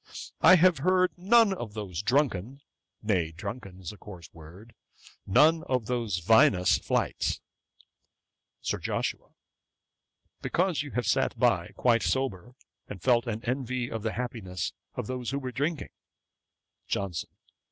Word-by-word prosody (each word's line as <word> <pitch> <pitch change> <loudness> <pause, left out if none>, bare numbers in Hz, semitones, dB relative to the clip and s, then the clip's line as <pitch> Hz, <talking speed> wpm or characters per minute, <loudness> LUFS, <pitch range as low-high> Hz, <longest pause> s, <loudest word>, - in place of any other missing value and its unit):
I 185 - +8
have 180 -3 +4
heard 185 +4 +3
none 205 +3 +4
of 115 - -7
those 100 -5 -4
drunken, 130 0 0 0.4
nay, 90 -7 +1
drunken 100 +1 -7
is 90 -3 -6
a 105 - -13
coarse 90 -5 -12
word, 85 +8 -14 0.5
none 160 +11 +5
of 125 -4 -1
those 115 -5 -1
vinous 90 -1 +4
flights.' - - -1 1.2
SIR - - -2
JOSHUA. - - -3 1.1
'Because 180 -3 0
you 145 - -6
have 125 - -1
sat 135 - +1
by, 100 -9 +2
quite 120 -2 +3
sober, 125 -3 -2 0.3
and 100 - -8
felt 120 +3 +2
an 115 0 -4
envy 125 -1 -2
of 115 - -4
the 110 +1 -2
happiness 110 -8 -4 0.2
of - - -3
those 125 0 -4
who 140 - -2
were 130 -2 -4
drinking.' 145 +5 -2 1.0
JOHNSON. 95 -5 -3
120 Hz, 135 wpm, -28 LUFS, 100-135 Hz, 1.2 s, I